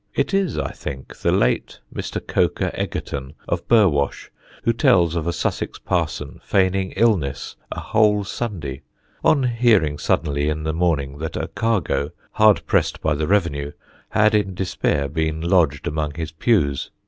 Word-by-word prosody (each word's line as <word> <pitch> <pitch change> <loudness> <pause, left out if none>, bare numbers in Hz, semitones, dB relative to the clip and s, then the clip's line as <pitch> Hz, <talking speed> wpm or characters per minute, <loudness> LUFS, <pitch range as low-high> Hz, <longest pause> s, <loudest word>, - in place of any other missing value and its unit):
It - - 0
is, 195 -2 +1
I - - -2
think, 65 -1 -8
the - - +1
late - - +1
Mr. - - -5
Coker - - 0
Egerton, 70 +1 -4
of - - -2
Burwash, 90 -12 +2 0.3
who 115 - +2
tells 95 - +3
of 85 -1 -2
a - - +2
Sussex 80 - -2
parson - - -2
feigning 95 0 +1
illness 85 - 0 0.2
a - - -4
whole 105 -2 +2
Sunday 85 - -4 0.4
on 140 -3 +4
hearing 115 - +2
suddenly 75 -1 0
in 75 0 -2
the 80 0 -1
morning 75 -5 0
that 80 0 -4
a 80 +1 -3
cargo, 95 -7 0 0.2
hard 110 -1 +4
pressed - - +1
by 80 - +1
the 75 +1 -1
revenue, 75 -8 0 0.4
had 110 0 +3
in 100 -3 +1
despair 85 -6 0
been 80 +2 -1
lodged 85 -5 +2
among 75 -1 -2
his 80 -1 -4
pews. 80 - +1
85 Hz, 155 wpm, -22 LUFS, 75-105 Hz, 0.4 s, on